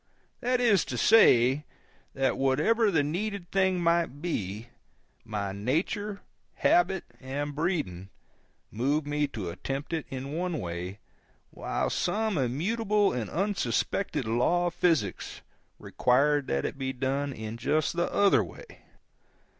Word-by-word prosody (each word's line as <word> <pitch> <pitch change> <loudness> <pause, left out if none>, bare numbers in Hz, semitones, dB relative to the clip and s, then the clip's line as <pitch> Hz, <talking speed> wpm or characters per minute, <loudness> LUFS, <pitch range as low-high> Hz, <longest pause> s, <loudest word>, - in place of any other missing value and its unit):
That 250 +1 +1
is 220 -7 +4
to 125 - -4
say, 130 - +5 0.5
that 135 -1 +1
whatever 155 - +2
the 160 -6 +2
needed 185 +4 -3
thing 190 -1 +2
might 170 -4 +1
be, 110 - -4 0.5
my 105 -2 -3
nature, 165 - -2 0.3
habit, 175 +1 +2 0.2
and 145 +2 -4
breeding 145 - -2 0.6
moved 140 +7 0
me 145 0 0
to 100 -10 -5
attempt 135 - -5
it 160 -2 -2
in 135 +1 -5
one 175 0 -2
way, 90 +3 -5 0.5
while - - -2
some 220 -1 0
immutable 200 - +1
and 115 -5 -3
unsuspected 165 - -1
law 125 +11 +2
of 175 - -1
physics 160 - 0 0.4
required 140 +3 +2
that 70 0 -1
it 140 - -4
be 130 0 -2
done 135 +2 -1
in 110 -2 -6
just 155 +7 0
the 170 0 0
other 200 -1 +4
way. - - -11
145 Hz, 130 wpm, -28 LUFS, 125-180 Hz, 0.6 s, say